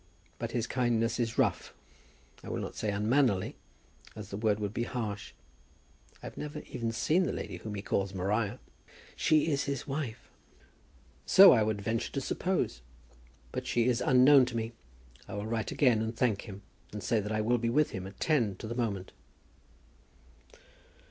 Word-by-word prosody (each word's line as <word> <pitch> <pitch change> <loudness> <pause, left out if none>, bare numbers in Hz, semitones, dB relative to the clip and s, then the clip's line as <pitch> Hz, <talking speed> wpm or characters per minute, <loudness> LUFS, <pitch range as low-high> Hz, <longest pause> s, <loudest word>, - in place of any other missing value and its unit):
But - - -3
his 120 -2 -1
kindness 120 -2 0
is 115 -2 -1
rough; - - 0 0.7
I - - -8
will - - -2
not - - -5
say 105 - -2
unmannerly, 105 0 +1 0.6
as 105 -2 -8
the - - -5
word 105 0 +1
would 105 -1 -3
be 120 - -2
harsh. 105 -5 -4 0.9
I - - -8
have - - -8
never 150 0 -5
even 115 -3 -2
seen 155 +9 +2
the - - -1
lady - - -5
whom 105 -1 -6
he 100 - -5
calls 100 -1 -1
Maria." 100 +5 -1 0.6
"She 155 +1 +3
is 140 -1 0
his 140 -3 -3
wife!" 135 -5 -4 1.0
"So 195 0 +9
I 115 - +5
would 105 -1 -1
venture 115 +3 -1
to 140 - -1
suppose; 180 - -1 0.7
but - - -4
she 120 -1 +2
is 125 -1 +1
unknown 130 +1 +6
to 120 -2 -4
me. 115 0 -3 0.6
I - - -7
will 100 +1 -4
write 110 -2 -2
again, 125 -6 +3
and 110 +1 -3
thank 115 -4 0
him, 100 0 -9 0.3
and 105 -1 -6
say 115 -2 +1
that 105 +1 -4
I 110 0 0
will 120 +3 +2
be 115 +1 0
with 150 +5 +2
him 95 0 -5
at 100 - -13
ten 120 -11 +1
to 105 - -9
the 115 - -4
moment." 105 -6 -2
115 Hz, 180 wpm, -30 LUFS, 105-125 Hz, 1.0 s, So